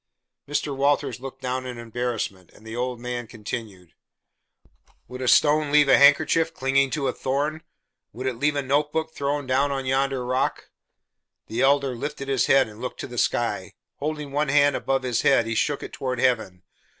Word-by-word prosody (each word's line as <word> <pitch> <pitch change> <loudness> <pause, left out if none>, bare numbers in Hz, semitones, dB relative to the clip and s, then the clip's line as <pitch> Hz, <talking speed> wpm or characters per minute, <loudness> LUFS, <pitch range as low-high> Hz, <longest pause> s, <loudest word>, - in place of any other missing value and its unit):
Mr. 145 -1 -1
Walters 140 -1 +1
looked 135 +1 -9
down 130 0 -2
in 125 -1 -6
embarrassment, 115 -5 -4
and 110 - -18
the 110 +1 -7
old 125 0 -3
man 120 -1 -4
continued. 105 - -7 1.1
"Would 125 +1 -8
a 130 - -2
stone 150 +3 +4
leave 150 -1 +5
a 135 - +7
handkerchief 160 +3 +4
clinging 135 +1 +2
to 135 +2 -2
a - - 0
thorn? 145 +4 -2 0.5
Would 125 +4 -7
it 125 -3 -2
leave 145 +2 +1
a 145 - -1
notebook 150 +4 0
thrown 145 0 -2
down 135 +2 +1
on 135 -1 -3
yonder 135 -1 0
rock?" 130 +1 -1 0.7
The 115 +3 -3
Elder 135 -1 +3
lifted 140 +2 -5
his 135 -3 +2
head 135 -2 +5
and 105 -1 -12
looked - - -5
to - - -5
the - - -4
sky: - - -1 0.2
holding 150 -1 -4
one 145 +1 0
hand 145 0 +4
above 135 -1 -1
his 125 -2 0
head 135 -4 +4
he 115 - -2
shook 140 +5 0
it - - -8
toward 130 -2 -3
heaven. 110 -9 0
135 Hz, 185 wpm, -24 LUFS, 125-145 Hz, 1.1 s, a